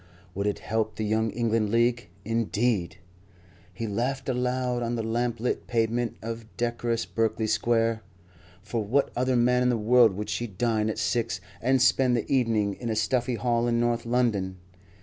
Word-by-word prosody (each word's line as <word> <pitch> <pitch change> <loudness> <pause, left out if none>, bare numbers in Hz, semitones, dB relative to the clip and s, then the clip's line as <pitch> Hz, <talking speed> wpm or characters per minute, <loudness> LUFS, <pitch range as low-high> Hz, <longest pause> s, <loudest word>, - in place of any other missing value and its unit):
Would 100 +2 -2
it 105 - 0
help 110 0 -2
the 110 - -2
Young 110 +1 +1
England 115 -1 0
League, 120 -1 +1 0.2
indeed! 115 -4 0 0.7
He 115 - -5
laughed 125 +6 -2
aloud 125 0 0
on 120 0 -1
the 115 - -2
lamp 120 +1 -1
lit 125 - -2
pavement 115 0 0
of 115 0 -5
decorous 120 -1 -1
Berkeley 110 0 -1
Square. 115 +1 +1 0.6
For 110 +1 -2
what 135 +7 +1
other 130 +1 +1
man 125 +1 +3
in 125 - +3
the 120 - +2
world 115 0 +5
would 105 +3 -4
she 120 - -2
dine 110 +1 0
at 110 - -3
six 115 -7 -1 0.2
and 130 +2 +3
spend 125 -1 +4
the 115 - -2
evening 110 -6 +2
in 120 +3 -5
a 110 - 0
stuffy 120 +3 0
hall 120 +1 0
in 115 0 +1
North 120 0 0
London? 110 -7 0
115 Hz, 170 wpm, -27 LUFS, 110-120 Hz, 0.7 s, world